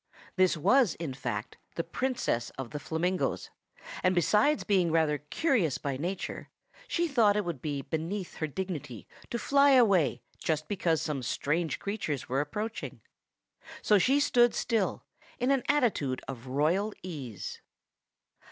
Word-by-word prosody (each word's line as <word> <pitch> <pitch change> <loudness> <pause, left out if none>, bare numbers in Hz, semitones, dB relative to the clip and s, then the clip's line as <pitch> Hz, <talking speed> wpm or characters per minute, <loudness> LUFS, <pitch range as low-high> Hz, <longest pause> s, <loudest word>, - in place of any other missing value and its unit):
This 185 -2 +3
was, 240 - +4
in 160 -5 -4
fact, 120 -5 -4 0.2
the 165 - -1
Princess 170 - -1
of 135 -3 -6
the 150 - -4
Flamingoes; 175 +5 -1 0.5
and 185 0 +2
besides 210 - +3
being 185 -5 +2
rather 155 -2 +2
curious 170 - +1
by 140 -2 -3
nature, 175 +7 -4 0.4
she 345 -6 0
thought 230 -9 +4
it 210 - 0
would 165 -7 -4
be 145 -3 -3
beneath 170 +6 -4
her 155 - -1
dignity 150 - -5 0.2
to 235 - -2
fly 280 +3 +4
away 190 - +4 0.2
just 155 -1 -1
because 170 -5 0
some 150 -4 -2
strange 155 +6 -1
creatures 200 - -3
were 130 +3 +1
approaching. 210 +10 -5 0.8
So 210 -2 +5
she 270 +8 +3
stood 240 -4 +4
still, 225 -5 0 0.3
in 250 +2 +1
an 270 -2 +3
attitude 220 - +1
of 130 -1 -7
royal 165 +11 +1
ease. 135 - -6
170 Hz, 145 wpm, -29 LUFS, 145-215 Hz, 0.8 s, So